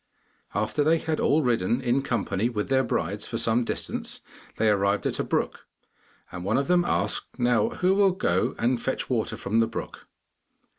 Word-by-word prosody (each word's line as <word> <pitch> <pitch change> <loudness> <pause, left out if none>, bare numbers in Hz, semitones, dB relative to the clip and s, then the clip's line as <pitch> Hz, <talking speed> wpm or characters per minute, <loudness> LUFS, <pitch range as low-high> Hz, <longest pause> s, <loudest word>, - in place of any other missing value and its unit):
After 110 +8 0
they 160 +3 +4
had 160 -1 -2
all 155 +1 +3
ridden, 120 -2 +1
in 130 +1 +1
company 115 -3 -1
with 105 -1 -3
their 135 0 +3
brides, 100 -3 -2
for 115 - -3
some 115 +1 +2
distance, - - -3 0.4
they 110 - +2
arrived 100 -1 +2
at - - -1
a - - +1
brook, - - -2 0.6
and 90 - -6
one 100 +4 +1
of 140 - 0
them 180 0 +4
asked, - - 0
'Now, 120 -3 +2
who 185 +1 +1
will 200 0 +4
go 95 - 0
and 120 0 +1
fetch 130 - -3
water 115 -3 -1
from 110 +3 0
the 115 - +3
brook? 115 - -7
120 Hz, 185 wpm, -26 LUFS, 105-135 Hz, 0.6 s, they